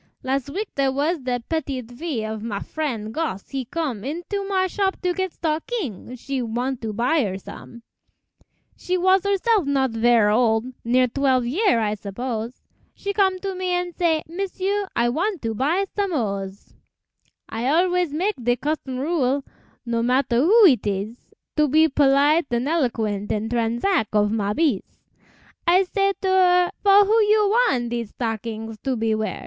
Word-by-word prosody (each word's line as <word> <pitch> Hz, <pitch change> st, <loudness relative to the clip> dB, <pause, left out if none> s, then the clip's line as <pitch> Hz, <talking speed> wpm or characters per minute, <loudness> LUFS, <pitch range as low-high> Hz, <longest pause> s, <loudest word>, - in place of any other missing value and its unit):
Las' 265 Hz, 0 st, -1 dB
w'ek 395 Hz, +8 st, -3 dB
dere 275 Hz, -1 st, +1 dB
was 300 Hz, +5 st, 0 dB
de 250 Hz, -2 st, -2 dB
petite 270 Hz, -7 st, -3 dB
fille 245 Hz, -3 st, -4 dB
Of 220 Hz, -, -7 dB
ma 215 Hz, -2 st, -4 dB
frien', 240 Hz, -9 st, -4 dB
Gosse, 270 Hz, -9 st, -4 dB
he 270 Hz, -2 st, -3 dB
com' 260 Hz, -6 st, -3 dB
Into 350 Hz, +8 st, -4 dB
ma 380 Hz, -1 st, +2 dB
shop 385 Hz, +1 st, -1 dB
to 360 Hz, -1 st, +1 dB
get 375 Hz, 0 st, -2 dB
stock_ing_, 310 Hz, -, -4 dB
She 270 Hz, 0 st, -3 dB
want 245 Hz, +2 st, -3 dB
to 220 Hz, -1 st, -3 dB
buy 245 Hz, +9 st, +1 dB
her 190 Hz, -3 st, -3 dB
som'; 235 Hz, +4 st, -11 dB, 0.9 s
She 365 Hz, 0 st, -2 dB
was 375 Hz, +1 st, +3 dB
herself 400 Hz, -, +2 dB
not 270 Hz, -3 st, +1 dB
verre 225 Hz, -2 st, +3 dB
ol', 225 Hz, -1 st, +3 dB, 0.2 s
Near 250 Hz, +2 st, +3 dB
twelve 260 Hz, -1 st, +1 dB
year, 305 Hz, -, +2 dB
I 210 Hz, -2 st, 0 dB
suppose; 225 Hz, +3 st, -5 dB, 0.3 s
She 400 Hz, 0 st, -4 dB
com' 385 Hz, -2 st, +2 dB
to 390 Hz, -1 st, -3 dB
me 365 Hz, -1 st, -2 dB
an' 355 Hz, 0 st, -1 dB
say, 330 Hz, -3 st, +1 dB
"M'sieu, 390 Hz, +3 st, -2 dB
I 235 Hz, -, +2 dB
wan' 365 Hz, -, -1 dB
to 225 Hz, -1 st, -2 dB
buy 310 Hz, -, +1 dB
som' 400 Hz, -3 st, -1 dB
hose." 200 Hz, -6 st, -4 dB, 0.7 s
I 230 Hz, +3 st, -3 dB
always 355 Hz, +2 st, +2 dB
mak' 370 Hz, +8 st, -1 dB
de 245 Hz, +1 st, +2 dB
custom 270 Hz, -1 st, -3 dB
rule, 280 Hz, -2 st, 0 dB, 0.4 s
No 235 Hz, -1 st, -1 dB
matter 250 Hz, 0 st, +1 dB
who 405 Hz, -, +6 dB
it 255 Hz, -, +4 dB
ees, 205 Hz, +3 st, -2 dB, 0.4 s
To 300 Hz, 0 st, +4 dB
be 315 Hz, +3 st, +4 dB
polite 285 Hz, +2 st, +3 dB
an' 240 Hz, +2 st, -1 dB
eloquent 225 Hz, -10 st, -1 dB
In 215 Hz, +1 st, -2 dB
transack 235 Hz, -, 0 dB
of 210 Hz, 0 st, +2 dB
ma 210 Hz, -2 st, -1 dB
beez; 295 Hz, -, -1 dB, 0.7 s
I 365 Hz, +3 st, +5 dB
say 395 Hz, +1 st, 0 dB
to -, -, +1 dB
her, 360 Hz, -1 st, +4 dB
"For 405 Hz, 0 st, +6 dB
who 440 Hz, +3 st, +3 dB
you 425 Hz, 0 st, +3 dB
wan' 240 Hz, -, -1 dB
Dese 235 Hz, -2 st, -3 dB
stockings 225 Hz, -1 st, -5 dB
to 265 Hz, -2 st, -2 dB
be 225 Hz, -1 st, 0 dB
wear?" 215 Hz, 0 st, -2 dB
270 Hz, 170 wpm, -23 LUFS, 230-360 Hz, 0.9 s, who